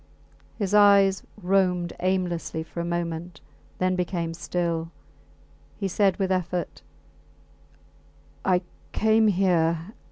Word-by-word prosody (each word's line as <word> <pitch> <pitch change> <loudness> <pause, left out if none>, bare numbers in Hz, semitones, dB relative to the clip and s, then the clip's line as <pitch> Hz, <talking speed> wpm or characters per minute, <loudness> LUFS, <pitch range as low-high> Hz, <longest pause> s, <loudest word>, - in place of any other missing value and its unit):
His 200 -3 -2
eyes 200 -2 +5 0.2
roamed 180 -2 +2
about - - -12
aimlessly 175 -3 -1
for 165 - -9
a - - -1
moment, 170 -1 -4 0.4
then 185 0 +1
became 175 -2 -2
still. 170 -1 -2 0.9
He 200 - -2
said 195 0 +2
with 190 -2 -1
effort 180 -1 -2 1.6
I 180 -1 +2 0.3
came 220 0 +3
here 175 -2 +1
180 Hz, 105 wpm, -25 LUFS, 170-195 Hz, 1.6 s, eyes